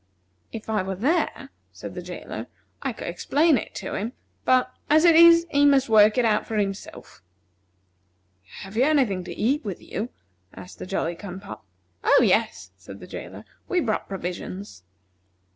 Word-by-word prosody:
"If 220 Hz, -, -8 dB
I 215 Hz, -3 st, 0 dB
were 190 Hz, +1 st, -4 dB
there," 280 Hz, -, -1 dB, 0.2 s
said -, -, -9 dB
the -, -, -6 dB
jailer, -, -, -7 dB, 0.3 s
"I -, -, -2 dB
could -, -, -8 dB
explain 310 Hz, +1 st, +2 dB
it 235 Hz, -, -4 dB
to -, -, -5 dB
him; 220 Hz, +5 st, -3 dB, 0.3 s
but, 255 Hz, 0 st, +3 dB, 0.2 s
as 310 Hz, +3 st, +5 dB
it 335 Hz, -2 st, +7 dB
is, 335 Hz, 0 st, +8 dB
he 285 Hz, 0 st, +3 dB
must 275 Hz, -3 st, +4 dB
work 215 Hz, 0 st, +6 dB
it 250 Hz, -, +3 dB
out 215 Hz, -2 st, +1 dB
for 220 Hz, -, -3 dB
himself." 195 Hz, -1 st, -5 dB, 1.4 s
"Have 195 Hz, +2 st, -10 dB
you 240 Hz, -, +3 dB
any 295 Hz, -3 st, +4 dB
thing 190 Hz, -4 st, -4 dB
to -, -, -7 dB
eat 270 Hz, +7 st, +1 dB
with 195 Hz, -5 st, -5 dB
you?" 225 Hz, +4 st, -5 dB, 0.5 s
asked 180 Hz, -, -12 dB
the -, -, -7 dB
Jolly 175 Hz, -3 st, -1 dB
cum 185 Hz, +1 st, -8 dB
pop. 195 Hz, -, -10 dB, 0.4 s
"Oh, -, -, +5 dB
yes," 95 Hz, -, 0 dB
said 95 Hz, +2 st, -12 dB
the -, -, -10 dB
jailer, -, -, -9 dB, 0.2 s
"we 365 Hz, -, +1 dB
brought 225 Hz, -10 st, -1 dB
provisions." 180 Hz, -, -6 dB
215 Hz, 175 wpm, -24 LUFS, 190-280 Hz, 1.4 s, is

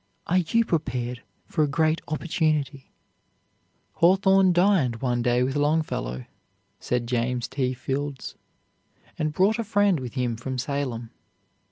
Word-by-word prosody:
Are 180 Hz, +2 st, +2 dB
you 230 Hz, +7 st, +1 dB
prepared 125 Hz, -, -2 dB, 0.2 s
for 155 Hz, -, 0 dB
a -, -, +2 dB
great 155 Hz, +2 st, +1 dB
opportunity? 155 Hz, -4 st, -1 dB, 1.1 s
"Hawthorne 190 Hz, +1 st, +5 dB
dined 175 Hz, -, +3 dB
one 120 Hz, -1 st, 0 dB
day 120 Hz, +1 st, +2 dB
with 135 Hz, +2 st, -1 dB
Longfellow," 145 Hz, -, -1 dB, 0.5 s
said 125 Hz, -1 st, -1 dB
James 120 Hz, 0 st, -1 dB
T. 130 Hz, -1 st, -2 dB
Fields, 135 Hz, +2 st, -4 dB, 0.9 s
"and 155 Hz, -1 st, 0 dB
brought 200 Hz, +8 st, +2 dB
a -, -, 0 dB
friend, 205 Hz, -5 st, +2 dB
with 125 Hz, -1 st, -7 dB
him 125 Hz, -3 st, -1 dB
from 130 Hz, +3 st, -5 dB
Salem. 125 Hz, -3 st, -3 dB
140 Hz, 130 wpm, -25 LUFS, 125-170 Hz, 1.1 s, Hawthorne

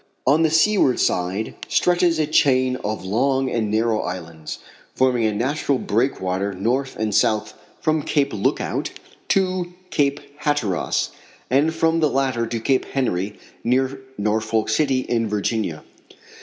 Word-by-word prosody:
On 145 Hz, +5 st, +4 dB
the 160 Hz, -, +4 dB
seaward 160 Hz, -4 st, +3 dB
side 95 Hz, +5 st, 0 dB
stretches 175 Hz, -1 st, +2 dB
a 155 Hz, -, +2 dB
chain 130 Hz, -4 st, +3 dB
of 105 Hz, -4 st, -4 dB
long 130 Hz, +6 st, +1 dB
and 110 Hz, -3 st, 0 dB
narrow 110 Hz, +1 st, +1 dB
islands, 85 Hz, -3 st, -6 dB, 0.4 s
forming 125 Hz, -3 st, +2 dB
a 110 Hz, -, +2 dB
natural 135 Hz, +5 st, 0 dB
breakwater 100 Hz, -5 st, -1 dB
north 125 Hz, +8 st, -1 dB
and 110 Hz, -1 st, -2 dB
south 105 Hz, +1 st, +2 dB, 0.3 s
from 155 Hz, 0 st, +1 dB
Cape 140 Hz, -1 st, 0 dB
Lookout 100 Hz, -, -1 dB, 0.4 s
to 185 Hz, -2 st, 0 dB, 0.2 s
Cape 140 Hz, 0 st, +1 dB, 0.2 s
Hatteras 145 Hz, -, 0 dB, 0.4 s
and 145 Hz, +5 st, +3 dB
from 165 Hz, 0 st, +1 dB
the 155 Hz, -2 st, +3 dB
latter 130 Hz, -4 st, 0 dB
to 115 Hz, -, -3 dB
Cape 130 Hz, +3 st, +1 dB
Henry, 105 Hz, -6 st, -2 dB, 0.3 s
near 130 Hz, +2 st, +1 dB, 0.2 s
Norfolk 110 Hz, +1 st, 0 dB
City, 130 Hz, +3 st, +2 dB
in 115 Hz, -3 st, -1 dB
Virginia. 105 Hz, -5 st, -1 dB
125 Hz, 135 wpm, -22 LUFS, 105-145 Hz, 0.4 s, On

